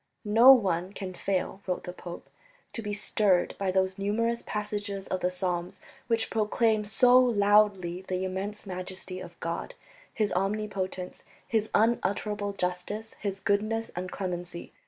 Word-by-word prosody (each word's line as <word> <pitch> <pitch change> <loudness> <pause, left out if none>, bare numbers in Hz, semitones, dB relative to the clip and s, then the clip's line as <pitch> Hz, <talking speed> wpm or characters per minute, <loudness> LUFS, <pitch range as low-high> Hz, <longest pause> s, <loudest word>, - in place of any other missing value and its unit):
"No 230 +5 +8
one 190 -7 +3
can 190 -3 -6
fail," 190 +1 -2
wrote 180 - -1
the 180 - -6
pope, 175 -1 -9 0.5
"to 230 - -4
be 210 -1 -4
stirred 205 -3 +2
by 195 -1 0
those 190 0 +1
numerous 230 +4 0
passages 205 -2 -3
of 185 - -1
the 180 - +1
Psalms 180 -1 -3 0.3
which 230 -1 0
proclaim 220 0 +2
so 245 +4 +6
loudly 205 -6 +3
the 185 0 -1
immense 195 +3 -4
majesty 185 0 -5
of 175 -2 -10
God, 170 - -4 0.4
His 210 -2 0
omnipotence, 195 -1 -2 0.2
His 220 -2 0
unutterable 210 -2 +1
justice, 190 +4 -3
His 195 -1 -2
goodness 215 +3 0
and 180 +1 -4
clemency 175 -2 -5
200 Hz, 140 wpm, -28 LUFS, 185-215 Hz, 0.5 s, No